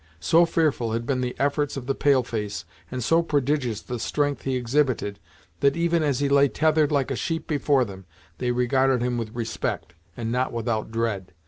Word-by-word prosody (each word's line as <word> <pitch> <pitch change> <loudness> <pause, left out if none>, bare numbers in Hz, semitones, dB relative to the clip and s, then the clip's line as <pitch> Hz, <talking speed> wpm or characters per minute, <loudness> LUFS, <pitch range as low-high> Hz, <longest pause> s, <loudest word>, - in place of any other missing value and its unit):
So 170 - +4
fearful 145 -9 +1
had 115 +1 -2
been 130 0 0
the 125 -1 -2
efforts 145 0 0
of 130 - -5
the 135 - 0
pale 135 -2 +3
face, 105 -8 -4 0.2
and 125 +5 -4
so 165 +8 +4
prodigious 140 -7 0
the 125 -1 -5
strength 145 +4 -1
he 135 -1 -1
exhibited, 125 -4 0 0.4
that 140 - +3
even 170 0 +2
as 145 -4 0
he 140 - +2
lay 140 0 +5
tethered 155 +1 +2
like 140 -2 +1
a - - 0
sheep 165 +5 -2
before 140 -3 +2
them, 95 -3 -10 0.3
they 125 - -1
regarded 125 +1 +2
him 120 -1 -1
with 115 0 -5
respect, 110 - -3 0.2
and 115 -1 -3
not 125 +2 0
without 115 -2 -2
dread. 110 -5 -2
130 Hz, 195 wpm, -25 LUFS, 115-145 Hz, 0.4 s, lay